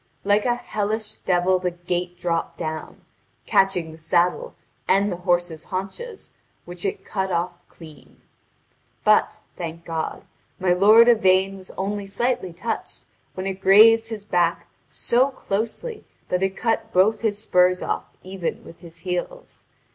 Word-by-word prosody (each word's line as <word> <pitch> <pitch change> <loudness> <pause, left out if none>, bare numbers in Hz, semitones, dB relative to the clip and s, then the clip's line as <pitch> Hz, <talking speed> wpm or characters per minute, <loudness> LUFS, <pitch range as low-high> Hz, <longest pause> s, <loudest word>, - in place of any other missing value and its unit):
Like 205 +1 +2
a 240 - +2
hellish 215 -1 -3
devil 180 0 +1
the 180 0 -1
gate 175 0 -4
dropped 170 -2 -2
down, 160 -1 -6 0.4
catching 180 -4 +2
the 160 - -12
saddle 175 - 0 0.3
and 200 +1 +3
the 175 - -3
horse's 175 -2 -1
haunches, 200 - -6 0.3
which 175 +2 -6
it 195 0 -3
cut 190 -1 -2
off 175 +1 -1
clean. 155 -3 -15 0.8
But, - - +3 0.2
thank 165 -1 -6
God, 165 -1 -4 0.4
my 180 -1 +3
lord 215 +6 +7
Yvain 195 -4 +4
was 190 -1 -12
only 200 +1 -3
slightly 235 -2 -1
touched 180 +7 -5 0.3
when 185 - -4
it 190 0 -4
grazed 225 +4 +7
his 220 -3 -7
back 170 -3 +1 0.2
so 250 +3 +2
closely 255 - -4 0.3
that 180 0 0
it 195 0 -1
cut 225 -1 -1
both 205 +4 +3
his 215 -3 0
spurs 180 -3 +2
off - - -2 0.2
even 185 -2 -5
with 165 - -13
his 170 -2 -12
heels. 185 - -5
190 Hz, 145 wpm, -23 LUFS, 175-210 Hz, 0.8 s, lord